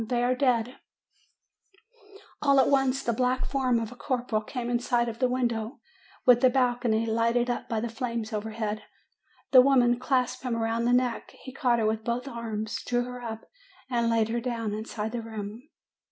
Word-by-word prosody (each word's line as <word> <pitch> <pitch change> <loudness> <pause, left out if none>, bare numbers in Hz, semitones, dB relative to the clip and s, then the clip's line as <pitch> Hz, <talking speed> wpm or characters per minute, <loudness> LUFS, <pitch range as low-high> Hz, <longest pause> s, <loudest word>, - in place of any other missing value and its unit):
They 240 +2 -1
are 250 +1 +3
dead 250 -2 +1 0.8
!' 410 0 -24
"All 280 -2 +4
at - - +4
once 270 -1 +2
the 235 - 0
black 255 +2 0
form 255 -4 +1
of 225 0 -4
the - - -10
corporal 245 -4 -1
came 240 +2 -5
in 240 0 +1
sight 240 -1 +1
at 230 -1 -5
the 255 - +3
window 240 0 -1 0.5
with 245 -1 +6
the 260 - +6
balcony, 245 -3 +1
lighted 230 +2 +1
up 240 - -4
by 225 -2 -1
the 235 - -2
flames 230 -1 -4
overhead. 215 0 -3 0.7
The 255 - +9
woman 245 -3 +4
clasped 255 -1 0
him 250 -3 -2
round 230 +1 0
the - - +3
neck; 250 -1 0
he 260 - -9
caught 250 -3 +2
her 225 - +1
with 220 0 0
both 240 +3 -2
arms, 225 -3 -4
drew 245 0 0
her 250 0 -7
up, 225 -2 -6 0.5
and 235 -1 +1
laid 225 -1 +2
her 235 +1 -1
down 230 -3 -3
inside 215 0 -4
the 240 0 -3
room. 220 +4 -7
240 Hz, 190 wpm, -27 LUFS, 225-255 Hz, 0.8 s, The